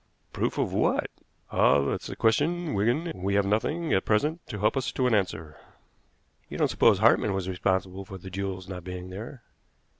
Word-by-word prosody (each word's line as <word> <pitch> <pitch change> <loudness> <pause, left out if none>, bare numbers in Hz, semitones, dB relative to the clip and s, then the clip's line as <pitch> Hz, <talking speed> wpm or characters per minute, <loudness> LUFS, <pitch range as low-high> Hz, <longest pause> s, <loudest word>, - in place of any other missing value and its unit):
"Proof - - -1
of - - -1
what?" - - +1 0.4
"Ah! - - +4
that's 70 - -2
the - - -6
question, 160 +9 +1
Wigan; 120 +11 +1
and 165 - -6
we 100 +1 0
have 100 -1 +3
nothing 150 +11 0
at 95 - +2
present 150 +10 +1
to 105 - -5
help 105 +5 +1
us 135 -2 -1
to 130 - 0
an 125 - +2
answer." 80 -7 -1 0.9
"You - - -6
don't - - +2
suppose - - +4
Hartmann 100 - +3
was 95 -1 -3
responsible 95 0 -1
for 95 0 -9
the 95 +1 -10
jewels 95 -1 -4
not 90 -2 -7
being 90 0 -7
there?" 115 +6 -8
100 Hz, 190 wpm, -27 LUFS, 95-125 Hz, 0.9 s, Ah